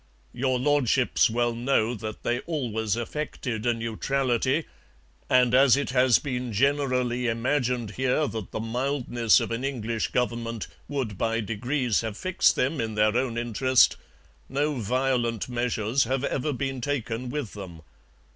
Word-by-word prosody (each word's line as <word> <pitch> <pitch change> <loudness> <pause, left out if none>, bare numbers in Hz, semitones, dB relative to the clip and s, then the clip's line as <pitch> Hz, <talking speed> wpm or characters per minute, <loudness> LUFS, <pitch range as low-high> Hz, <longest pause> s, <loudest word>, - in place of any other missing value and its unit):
Your 130 0 0
Lordships 130 -3 +2
well 120 +1 0
know 120 -1 +1
that 110 -1 -7
they 120 +1 0
always 115 - -2
affected 120 -2 -4
a 120 - +4
neutrality, 130 +5 0 0.6
and 125 -1 +4
as 135 0 +6
it 140 - -2
has 125 -3 +5
been 125 -3 -4
generally 125 0 +1
imagined 120 -1 0
here 130 +6 +1
that 110 -4 -5
the - - -4
mildness 120 0 +1
of - - -3
an 115 +2 -2
English 115 -5 -2
Government 115 -2 -2 0.2
would 125 -9 -3
by 115 0 0
degrees 120 +3 -1
have 110 -2 -5
fixed 185 +1 +2
them 135 +1 0
in 110 -1 -3
their 105 +1 +3
own 125 -2 0
interest, 120 +2 +3 0.5
no 145 +3 0
violent 120 -1 0
measures 120 0 0
have 130 +3 -1
ever 140 +2 -1
been 135 -1 -3
taken 125 -2 -2
with 140 -5 -4
them. 90 -6 -9
125 Hz, 145 wpm, -26 LUFS, 115-135 Hz, 0.6 s, as